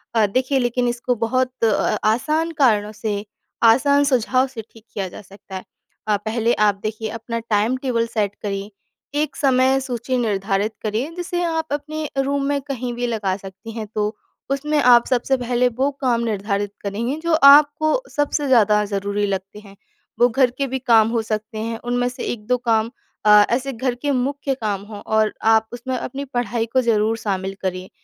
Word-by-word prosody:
अ, 220 -2 +5
देखिए, 255 +6 0
लेकिन 245 0 0
इसको 245 +1 -1
बहुत 255 +2 0
अ - - +6
अ, 215 - +1
आसान 310 +8 0
कारणों 210 -4 +3
से, 210 -1 -4 0.4
आसान 280 +5 +5
सुझाव 255 +2 +2
से 225 - -5
ठीक 225 - -17
किया 195 -2 -3
जा - - -10
सकता 195 0 -13
है। 185 - -5 0.4
अ, 210 -1 +2
पहले 225 +3 0 0.2
आप 200 - -1
देखिए, 220 0 -3
अपना 230 +1 -4
टाइम 220 +1 0
टेबल 230 -2 +1
सेट 205 -2 0
करिए। 200 0 -3 0.5
एक 300 +1 -1
समय 265 -1 +3
सूची 255 -1 -2
निर्धारित 205 -2 0
करिए, 220 +7 -1
जिसे 355 0 -3
आप 325 -1 -1
अपने 305 +1 -4
रूम 280 0 -1
में 285 0 0
कहीं 255 -3 -4
भी 245 +1 -2
लगा 205 -5 -1
सकती 195 +3 -10
हैं। 220 -1 -5
तो 210 +1 -1 0.4
उसमें 300 +2 0
आप 240 -2 +6
सबसे 260 +1 +1
पहले 245 0 +1
वो 275 +2 +3
काम 245 -3 +1
निर्धारित 205 -2 -2
करेंगे, 225 +7 -2
जो 335 +1 -1 0.2
आपको 305 +7 +4
सबसे 290 -1 0
ज़्यादा 210 -4 +4
ज़रूरी 200 +1 -1
लगते 195 +1 -4
हैं। 200 -2 -15 0.4
वो 245 - +5
घर 250 +1 +2
के 275 - 0
भी 265 - 0
काम 225 -3 +4
हो 230 -1 0
सकते 215 +1 -3
हैं। 225 +1 -3
उनमें 245 0 0
से 250 +1 -7
1-2 240 +2 -1
काम 230 -2 +1 0.3
अ, 210 0 +8
ऐसे 265 +3 0
घर 245 +1 -2
के 285 +4 -2
मुख्य 275 +2 -1
काम 210 -6 -3
हों, 210 -2 -8
और 220 0 +1
आप 220 0 +4
उसमें 255 +2 -4
अपनी 275 +4 -5
पढ़ाई 245 -3 -2
को 260 - +4
ज़रूर 225 -2 +1
शामिल 195 -3 -3
करिए। 185 0 -3
235 Hz, 185 wpm, -21 LUFS, 210-260 Hz, 0.5 s, अ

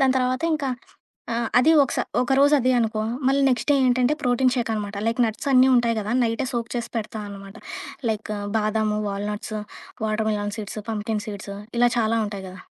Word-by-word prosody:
దాని 265 -1 +4
తర్వాత 255 +1 0
ఇంక 305 -2 -3 0.7
ఆ! - - 0 0.2
అది 255 +6 +5
ఒకసా 275 - 0 0.2
ఒకరోజు 270 +3 +4
అదె 255 0 +2
అనుకో, 220 -2 0 0.3
మళ్ళీ 275 +1 +3
నెక్స్ట్ 255 +2 0
డే - - +6
ఏంటంటే 250 +3 +3
ప్రోటీన్ 250 0 +2
షేక్ 240 -3 -1
అన్నమాట. 210 -2 -3
లైక్ 230 +1 0
నట్స్ 225 +4 -3
అన్నీ 260 0 +6
ఉంటాయి 235 -2 +3
గదా! 215 +2 -2
నైటే 230 +3 0
సోక్ 235 -1 -3
చేసి 240 -1 -3
పెడతాన్నమాట 205 -2 -6 0.5
like 215 -1 -3 0.2
బాదాము, 215 0 +1
walnuts, 210 +2 -4 0.4
watermelon 215 -1 -1
seeds, 210 0 -5
pumpkin 215 -1 -2
seeds, 200 -1 -6 0.2
ఇలా 245 0 +5
చాలా 225 0 +2
ఉంటాయి 200 -2 -6
గదా! 185 0 -11
225 Hz, 170 wpm, -24 LUFS, 210-250 Hz, 0.7 s, డే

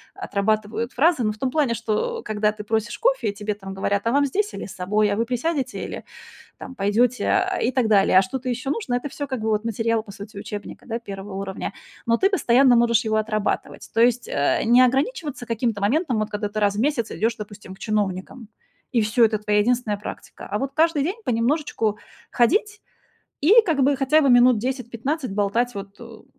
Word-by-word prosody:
отрабатывают 215 +3 -1
фразы, 305 0 +3
ну, 215 -1 0
в - - -15
том 260 +2 -2
плане, 285 -5 +1
что, 230 - -2
когда 210 0 0
ты 210 -1 -8
просишь 220 +1 -2
кофе - - +1
и - - -13
тебе 210 +1 -3
там 195 -1 -9
говорят: 200 +2 -1
"А - - +2
вам 285 +2 +3
здесь 410 +10 -1
или - - -6
с - - -9
собой? 205 +3 +1
А 200 - -1
вы 230 - +1
присядете 265 +4 -2
или, - - -7 0.5
там, 260 - -9
пойдёте?" 230 +4 +1
Э, 380 -1 +1
и 240 - +1
так 255 -3 +1
далее. 200 -3 +4
"А - - +8
что-то 255 +7 -4
ещё 250 +3 -2
нужно?"- 290 - -2
Это 245 +3 -2
всё 285 +1 -5
как 260 -3 -4
бы 220 - -3
вот 215 0 0
материал, 230 0 0
по 210 - -11
сути, 200 +2 -11
учебника, 205 0 -7
да, 230 0 -3
1 195 -3 -8
уровня. 195 0 -5 0.3
Но 230 0 +2
ты 390 - +3
постоянно 265 - +4
можешь 235 0 +4 0.2
его 220 0 +1
отрабатывать, 215 -1 -2
то 225 - +2
есть, 240 0 +3
э, 140 - +1
не 240 +3 +6
ограничиваться 270 - 0
каким-то 230 -2 -1
моментом, 255 - +1
вот 215 0 -2
когда 210 0 -3
ты 215 +1 -3
раз 205 -1 +2
в - - -3
месяц 245 -3 0
идёшь, 225 +2 0
допустим, 205 -2 -10
к - - -24
чиновникам, 210 +2 -3 0.4
и 235 - +2
всё, 220 +3 +4
это 220 -1 +1
твоя 210 0 +1
единственная 230 -1 +1
практика. 210 - -9
А 210 - -1
вот 270 +4 -3
каждый 315 -1 +2
день 375 +9 -3
понемножечку 230 - 0 0.3
ходить 420 - +1 0.6
и 410 +11 +7
как 310 -7 +2
бы 280 +2 +3
хотя 275 +4 +3
бы 280 - +3
минут 245 -1 +6
10-15 255 +3 -3
болтать 210 +4 0
вот, 200 0 -8
ну, 230 -2 -12
230 Hz, 210 wpm, -23 LUFS, 210-265 Hz, 0.6 s, А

